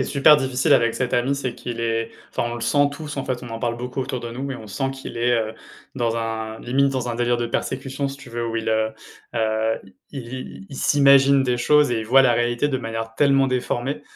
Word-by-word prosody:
est - - -5
super 145 +2 +6
difficile 130 -2 +1
avec 115 -1 +4
cet 125 -1 -1
ami, 130 +3 +1
c'est 130 -3 -3
qu'il 120 -1 -6
est, 115 -1 -1 0.2
enfin, 120 - -2
on - - -4
le - - -7
sent 140 +5 +3
tous, 150 0 -7
en 135 - -2
fait, 130 -1 -3
on 120 - -9
en 115 0 -5
parle 120 -1 -1
beaucoup 125 +2 -4
autour 130 0 -3
de 120 -1 -6
nous, 130 +3 -6
mais 135 -2 -3
on 110 - -10
sent 135 +6 -2
qu'il 135 -2 -8
est, 120 +1 +1
heu, 110 -2 0 0.4
dans 120 -3 0
un 110 -1 -3
limite 135 +3 +1
dans 130 -2 -2
un 120 - -2
délire 120 +1 +1
de 120 0 -2
persécution, 135 +3 -3
si 135 - -7
tu 135 -2 -13
veux, 120 0 -3
où 115 0 -3
il 115 - -2
heu, 110 0 +1 0.5
heu, 110 0 +1 0.3
i 140 - -7
i 125 0 -7 0.3
i - - -14
il 135 - -9
s'imagine 140 -1 +5
des 125 -1 +1
choses 150 +1 +4
et 115 - 0
il 110 - -6
voit 135 +3 +6
la 125 -2 +4
réalité 120 +3 +1
de 140 -3 0
manière 115 -1 -5
tellement 135 0 +4
déformée, 130 +1 -2
125 Hz, 255 wpm, -22 LUFS, 115-135 Hz, 0.5 s, super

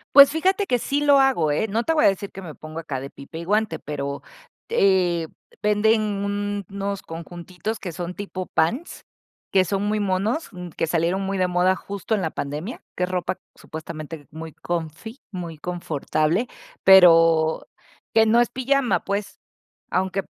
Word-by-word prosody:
Pues 280 0 +11
fíjate, 380 +6 +1
que 245 - +2
sí 280 +5 -1
lo 285 -1 +6
hago, 170 - +3
¿eh? 220 +9 0
No 225 +3 0
te 325 - +2
voy 305 - +4
a - - +8
decir 200 +1 -2
que 195 - -8
me 160 -4 -8
pongo 155 +1 -9
acá 145 -5 -4
de 135 +1 -7
pipa 140 +4 -10
y 170 - -6
guante, 210 +3 +1
pero 140 -1 -5 0.4
t 185 - +3
eh, - - -9 0.3
venden 210 +1 +3 0.7
unos 200 0 -4
conjuntitos 175 +6 -6
que 180 -4 -6
son 175 +1 -5
tipo 190 -2 -5
pants, 230 - -1 0.5
que 190 -1 +5
son 195 +2 -1
muy 210 +1 0
monos, 205 - 0
mm, 180 -1 -8
que 165 - -2
salieron 170 +4 0
muy 195 0 -2
de 185 - +3
moda 180 +1 +2
justo 200 +3 -3
en 205 - 0
la 160 - -1
pandemia, 150 - -5
que 180 - +1
es 180 - -4
ropa 180 0 -2 0.2
supuestamente 155 -2 -8
muy 160 0 -8
comfy, 170 - -5
muy 170 -5 -6
confortable, 170 - -1 0.4
pero, 165 -4 +6 0.5
que 225 - +6
no 230 +2 +5
es 240 - +3
pijama, 260 +1 +1
pues, 200 0 -3 0.5
aunque 190 +1 0
185 Hz, 175 wpm, -23 LUFS, 165-215 Hz, 0.7 s, Pues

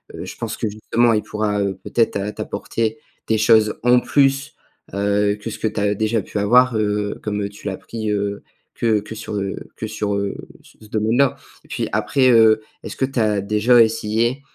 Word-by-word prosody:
heu, - - -6
je - - -8
pense - - -4
que, - - -2
justement, 115 +3 +1
il 105 - +1
pourra, 105 -1 -2
heu, 100 -1 -1
peut-être 115 -1 +1
t'a 100 +1 -2
t'apporter 110 +1 -3 0.3
des 110 - +2
choses 110 0 +4
en 125 0 +5
plus, 135 +1 +1 0.4
heu, 100 +1 +1
que 110 - -5
ce - - -8
que - - 0
tu 110 - -3
as 100 0 +1
déjà 110 0 0
pu 105 - -4
avoir, 125 +4 +4
heu, 105 -1 -1
comme 105 -1 -2
tu 105 0 -10
l'as 95 -2 -3
pris, 110 -2 -5
heu, 100 0 -2 0.3
que 110 -2 +1
que 105 +2 -9
sur, 105 - -6
heu, 100 -1 -2 0.2
que - - -4
sur, 105 -1 -2
heu, 100 0 -2 0.3
ce - - -21
ce 110 - -14
domaine-là, 115 +5 +1 0.3
et - - -22
puis - - -2
après, 130 -2 +2
heu, 110 -2 +5 0.2
est-ce - - -7
que 130 - +2
tu 135 -1 -3
as 105 -2 +2
déjà 105 +5 +3
essayé, 115 +3 +1
110 Hz, 205 wpm, -20 LUFS, 105-115 Hz, 0.4 s, en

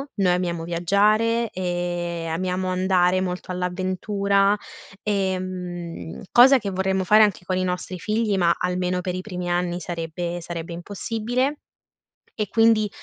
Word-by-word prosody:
noi 190 -4 +3
amiamo 175 -2 -1
viaggiare 210 +7 +2
e 175 -2 -3
amiamo 185 +3 -1
andare 185 0 +2
molto 180 0 -4
all'avventura, 195 +3 +1 0.5
ehm, 185 -4 -3
cosa 265 +3 +8
che 200 -3 -4
vorremmo 190 0 0
fare 215 +3 +7
anche 200 -4 0
con 185 - -1
i 185 - 0
nostri 180 0 -3
figli, 215 +2 0
ma, 170 -2 +4
almeno 180 0 0
per 180 0 -3
i 185 - -3
primi 180 -3 -5
anni, 175 0 0
sarebbe 170 0 -4
sarebbe 170 0 -6
impossibile. 225 - -2 0.8
E 210 - 0
quindi 225 -2 +4
185 Hz, 135 wpm, -23 LUFS, 175-200 Hz, 0.8 s, cosa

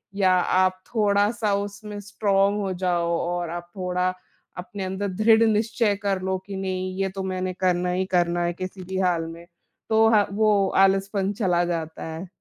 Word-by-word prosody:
या 190 -2 +3
आप 185 +1 +2
थोड़ा-सा 205 0 +2
उसमें 205 +1 -5
स्ट्रॉन्ग 200 0 +1
हो 195 -1 -2
जाओ 175 -2 0
और 175 -1 -2
आप 175 0 -6
थोड़ा 180 0 0 0.5
अपने 190 +2 -6
अंदर 190 +2 -3 0.2
दृढ़ 225 0 +6
निश्चय 215 0 +1
कर 195 -2 0
लो 190 0 0
कि 200 - -6
नहीं 185 -1 -3
ये 195 0 +1
तो 195 - -3
मैंने 185 -1 -2
करना 180 -1 +1
ही 185 +1 0
करना 175 0 +2
है 175 0 0
किसी 185 +1 -7
भी 190 +1 -4
हाल 175 -3 +1
में। 165 +1 -9 0.4
तो 220 0 +5
हाँ, 210 -2 +4
वो 205 -2 +3
आलसपन 195 +1 +2
चला 180 -5 +1
जाता 165 -2 -4
है। 170 +4 -7
190 Hz, 175 wpm, -24 LUFS, 180-205 Hz, 0.5 s, दृढ़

